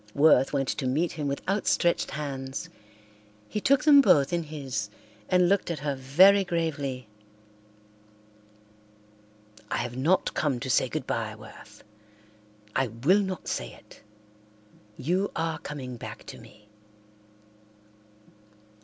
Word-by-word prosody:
Worth 140 -3 +5
went 135 -2 -1
to 130 - -2
meet 155 +7 0
him 150 -3 -4
with 140 0 -4
outstretched 190 -3 +1
hands. 135 -3 -5 0.8
He 210 - -4
took 275 +3 +3
them 290 -2 +8
both 145 - +4
in 170 - +1
his 135 -8 -4 0.4
and 180 -1 +4
looked 195 0 +1
at 170 - -2
her 145 -1 -1
very 180 +10 +5
gravely. 145 - -3 2.6
"I - - -1
have 120 0 -4
not 160 +9 +1
come 140 -6 -1
to 130 - -2
say - - +2
goodbye, - - -3
Worth. - - -14 0.9
I 130 - +2
will 130 - +2
not 190 -2 -5
say - - -4
it. - - -18 1.0
You 180 +9 0
are 165 -1 -2
coming 130 -4 -7
back - - -9
to - - -12
me." 105 0 -17
150 Hz, 125 wpm, -27 LUFS, 130-175 Hz, 2.6 s, them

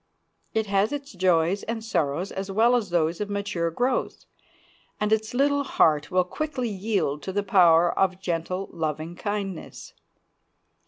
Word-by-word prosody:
It 220 -1 +1
has 200 +1 +1
its 285 -1 -5
joys 180 0 +2
and 225 -1 -4
sorrows 170 -3 -1
as 195 +1 -5
well 225 +5 +4
as 225 -5 -1
those 170 +1 0
of 205 - -3
mature 200 -4 -1
growth, 245 +9 -1 0.7
and 210 +1 +1
its 220 +2 -1
little 285 +2 +3
heart 155 - +2
will 185 -1 +3
quickly 255 - -3
yield 190 -8 -1
to 190 - -5
the 205 +1 -1
power 175 -3 +5
of 185 -1 +2
gentle, 180 +1 -3
loving 160 0 -3
kindness. 200 -2 -5
195 Hz, 150 wpm, -25 LUFS, 170-220 Hz, 0.7 s, power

